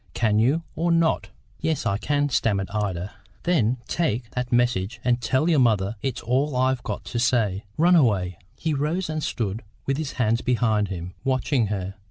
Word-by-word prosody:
Can 110 Hz, -2 st, +2 dB
you, 140 Hz, +9 st, +2 dB
or 170 Hz, +2 st, +1 dB
not?" 165 Hz, -1 st, +2 dB, 0.3 s
"Yes, 160 Hz, -5 st, -1 dB
I 100 Hz, -3 st, 0 dB
can," 145 Hz, +1 st, +1 dB
stammered 100 Hz, -6 st, 0 dB
Ida. 100 Hz, -3 st, -2 dB, 0.3 s
"Then 130 Hz, -9 st, +2 dB
take 120 Hz, -8 st, -1 dB
that 125 Hz, 0 st, -3 dB
message, 120 Hz, -3 st, +1 dB
and 125 Hz, -1 st, +2 dB
tell 130 Hz, +7 st, +1 dB
your 160 Hz, -4 st, +4 dB
mother 110 Hz, -4 st, +2 dB
it's 135 Hz, -3 st, -2 dB
all 130 Hz, +4 st, +1 dB
I've 130 Hz, 0 st, +2 dB
got -, -, -4 dB
to 120 Hz, -, -3 dB
say. 110 Hz, -6 st, +1 dB
Run 175 Hz, +3 st, +5 dB
away." 95 Hz, -, +2 dB, 0.2 s
He 160 Hz, +2 st, -1 dB
rose 155 Hz, +5 st, -1 dB
and 155 Hz, 0 st, -2 dB
stood 110 Hz, -5 st, -2 dB, 0.2 s
with 135 Hz, 0 st, 0 dB
his 155 Hz, -3 st, -3 dB
hands 115 Hz, -1 st, +1 dB
behind 110 Hz, -4 st, +1 dB
him, 90 Hz, -1 st, -6 dB
watching 130 Hz, -2 st, +1 dB
her. 95 Hz, -2 st, -3 dB
120 Hz, 180 wpm, -24 LUFS, 105-145 Hz, 0.3 s, Run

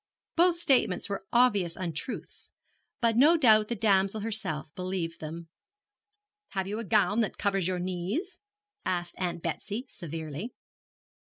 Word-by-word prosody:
Both 345 Hz, 0 st, +4 dB
statements 260 Hz, -, +2 dB
were 195 Hz, -1 st, -4 dB
obvious 205 Hz, -9 st, +3 dB
untruths, 175 Hz, -, -5 dB, 0.5 s
but 230 Hz, -2 st, +3 dB
no 300 Hz, +8 st, +6 dB
doubt 215 Hz, -7 st, +5 dB
the 235 Hz, -, -2 dB
damsel 200 Hz, -1 st, +2 dB
herself 195 Hz, -9 st, -3 dB
believed 180 Hz, -2 st, -3 dB
them. 165 Hz, +2 st, -7 dB, 1.1 s
'Have 190 Hz, -1 st, -1 dB
you 210 Hz, +3 st, -3 dB
a -, -, -3 dB
gown 210 Hz, +2 st, +3 dB
that 220 Hz, -, 0 dB
covers 195 Hz, -3 st, +1 dB
your 185 Hz, -1 st, 0 dB
knees?' 185 Hz, -, -3 dB, 0.4 s
asked 175 Hz, -1 st, -1 dB
Aunt 175 Hz, -2 st, -2 dB
Betsy, 205 Hz, +8 st, -3 dB
severely. 160 Hz, -, -6 dB
195 Hz, 135 wpm, -29 LUFS, 175-225 Hz, 1.1 s, no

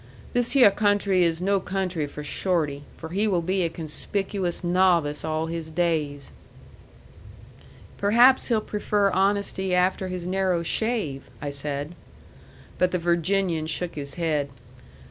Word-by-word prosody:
This 245 Hz, +2 st, +2 dB
hyeh 250 Hz, -7 st, +7 dB
country 205 Hz, -3 st, +2 dB
is 165 Hz, 0 st, 0 dB
no 200 Hz, +1 st, +2 dB
country 185 Hz, -5 st, -2 dB
for 150 Hz, +1 st, -8 dB
Shorty, 150 Hz, -3 st, -1 dB
for 160 Hz, -, -8 dB
he 200 Hz, +5 st, +1 dB
will 180 Hz, -5 st, +1 dB
be 185 Hz, +2 st, 0 dB
a 170 Hz, -, +1 dB
conspicuous 180 Hz, +4 st, -3 dB
novice 175 Hz, -4 st, +2 dB
all 155 Hz, 0 st, -1 dB
his 165 Hz, -1 st, -5 dB
days." 155 Hz, -4 st, -1 dB, 1.7 s
"Perhaps 240 Hz, +6 st, +5 dB
he'll 225 Hz, -3 st, +2 dB
prefer 205 Hz, -1 st, 0 dB
honesty 190 Hz, -1 st, 0 dB
after 185 Hz, +1 st, +1 dB
his 180 Hz, -1 st, -5 dB
narrow 185 Hz, -2 st, 0 dB
shave," 195 Hz, -, -2 dB
I 145 Hz, -, -4 dB
said. 145 Hz, +2 st, -4 dB, 0.9 s
But 180 Hz, -, +3 dB
the 180 Hz, -, -1 dB
Virginian 170 Hz, -1 st, 0 dB
shook 170 Hz, +2 st, -2 dB
his 140 Hz, -2 st, -6 dB
head. 155 Hz, -4 st, -1 dB
180 Hz, 135 wpm, -25 LUFS, 160-195 Hz, 1.7 s, hyeh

